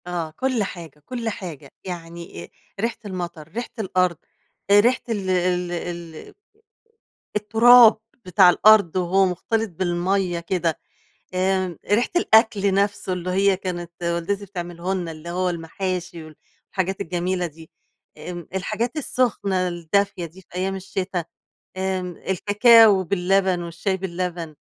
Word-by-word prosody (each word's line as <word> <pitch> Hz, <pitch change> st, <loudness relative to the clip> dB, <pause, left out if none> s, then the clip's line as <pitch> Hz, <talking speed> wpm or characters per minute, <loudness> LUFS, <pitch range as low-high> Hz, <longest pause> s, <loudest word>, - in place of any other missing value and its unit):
آه 170 Hz, -3 st, -3 dB
كل 255 Hz, +3 st, -1 dB
حاجة، 165 Hz, -6 st, -8 dB
كل 235 Hz, -3 st, -3 dB
حاجة 165 Hz, -9 st, -8 dB
يعني 170 Hz, -, -8 dB
أ -, -, -19 dB, 0.3 s
ريحة 230 Hz, 0 st, 0 dB
المطر، 175 Hz, -5 st, -6 dB
ريحة 225 Hz, +9 st, -5 dB
الأرض، 185 Hz, -4 st, +1 dB, 0.5 s
آآ 205 Hz, 0 st, +7 dB
ريحة 240 Hz, +4 st, +3 dB
ال 200 Hz, -4 st, -2 dB
ال 180 Hz, -1 st, +1 dB
ال 170 Hz, -2 st, -6 dB, 1.0 s
التراب 225 Hz, +2 st, +7 dB, 0.3 s
بتاع 180 Hz, 0 st, +6 dB
الأرض 200 Hz, -2 st, +5 dB
وهو 185 Hz, +2 st, +3 dB
مختلط 220 Hz, +4 st, -1 dB
بالمَيَّة 175 Hz, +1 st, -1 dB
كده، 170 Hz, -1 st, -1 dB, 0.6 s
آآ 185 Hz, -2 st, 0 dB
ريحة 230 Hz, +4 st, +3 dB
الأكل 220 Hz, -, +4 dB
نفسه 200 Hz, -1 st, 0 dB
اللي 180 Hz, 0 st, -3 dB
هي 195 Hz, +1 st, +3 dB
كانت 175 Hz, -2 st, -5 dB
والدتي 170 Hz, +4 st, -1 dB
بتعمله 175 Hz, -1 st, -4 dB
لنا 175 Hz, -3 st, -3 dB
اللي 160 Hz, +2 st, -9 dB
هو 180 Hz, +1 st, 0 dB
المحاشي، 175 Hz, 0 st, -4 dB
والحاجات 185 Hz, +4 st, -6 dB
الجميلة 180 Hz, 0 st, -2 dB
دي، 160 Hz, 0 st, -13 dB, 0.5 s
آآ 170 Hz, +2 st, -7 dB
الحاجات 220 Hz, -, -2 dB
السخنة 205 Hz, -10 st, 0 dB
الدافية 180 Hz, +2 st, -1 dB
دي 170 Hz, +4 st, -15 dB
في -, -, -35 dB
أيام 190 Hz, +1 st, -1 dB
الشتا، 190 Hz, -2 st, -3 dB, 0.5 s
آمم 185 Hz, -2 st, -2 dB
الكاكاو 210 Hz, +1 st, +5 dB
باللبن، 185 Hz, 0 st, +1 dB
والشاي 170 Hz, +3 st, -2 dB
باللبن. 175 Hz, -3 st, -4 dB
185 Hz, 125 wpm, -23 LUFS, 175-200 Hz, 1.0 s, آآ